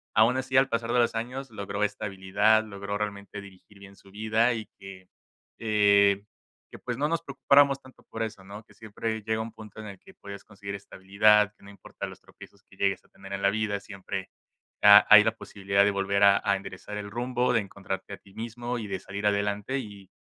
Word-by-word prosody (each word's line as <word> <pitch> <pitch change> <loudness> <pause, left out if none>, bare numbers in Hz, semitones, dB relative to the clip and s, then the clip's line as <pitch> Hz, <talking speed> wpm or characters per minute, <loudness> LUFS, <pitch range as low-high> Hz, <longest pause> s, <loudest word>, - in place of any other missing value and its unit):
aún 115 +4 +4
así 130 0 -3
al 135 +1 +5
pasar 115 0 -2
de 125 - +3
los 120 - +2
años 125 +4 -5
logró 100 -1 -4
estabilidad, 105 +2 +1
logró 100 -1 -5
realmente 100 -1 -5
dirigir 100 +1 -16
bien 100 0 -14
su 95 - -19
vida 110 +3 +1
y 110 -2 -5
que, 95 -1 -12 0.5
eh, 100 -2 +3 0.5
que, - - -11
pues, 125 -1 -5
no 145 +2 +1
nos 165 +1 -1
preocupáramos 140 -1 +3
tanto 130 -1 -19
por 115 - -6
eso, 105 -3 -7
¿no?, 100 +3 -10
que - - -21
siempre 110 0 -5
llega 110 +1 -2
un 115 +1 -6
punto 110 -2 -12
en 110 - -8
el 100 -2 -10
que - - -17
puedes 100 0 -10
conseguir 100 -1 -9
estabilidad, 100 +2 +2
que - - -25
no 100 - -13
importa 100 - -9
los - - -11
tropiezos 100 - -17
que 95 - -21
llegues 100 0 -1
a - - -24
tener 95 0 -14
en 100 - -4
la 100 - +5
vida, 105 -1 -1
siempre 95 -1 -7 0.5
ha 105 0 +9
hay 105 0 +10
la 110 - +2
posibilidad 100 0 0
de 105 - +3
volver 100 0 0
a 100 0 +6
a 100 -1 +2
enderezar 95 +2 -8
el 100 0 -6
rumbo, 125 +1 0
de 115 - +3
encontrarte 95 0 -7
a - - -7
ti 95 - -21
mismo 120 +2 -5
y 110 - -6
de 95 -1 -4
salir 100 +2 -6
adelante, 105 +4 -1
y 100 -5 -10
105 Hz, 215 wpm, -27 LUFS, 100-115 Hz, 0.5 s, hay